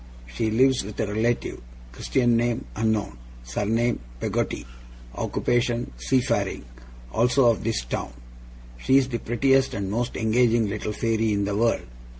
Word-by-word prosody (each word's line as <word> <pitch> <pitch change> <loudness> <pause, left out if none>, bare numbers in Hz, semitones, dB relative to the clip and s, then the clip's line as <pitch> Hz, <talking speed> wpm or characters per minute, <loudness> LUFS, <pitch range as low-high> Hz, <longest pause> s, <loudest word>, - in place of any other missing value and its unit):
She - - -2
lives 130 +4 +3
with 105 +2 -9
a - - +1
relative; 110 - -1 0.3
Christian 120 - +1
name, 120 0 0
unknown; 110 - -1 0.2
surname, 110 - 0 0.2
Peggotty; - - -2 0.5
occupation, 120 - 0
seafaring; 130 - 0 0.5
also 125 - +3
of 115 - -3
this 110 - -1
town. - - -4 0.7
She 130 - +4
is 135 -1 +2
the 120 -2 -2
prettiest 135 +4 +2
and 100 -1 -3
most 120 +3 -2
engaging 115 0 +3
little 105 +1 -3
fairy 110 0 0
in 100 0 0
the 100 0 -1
world. 115 +2 +1
115 Hz, 140 wpm, -25 LUFS, 105-120 Hz, 0.7 s, She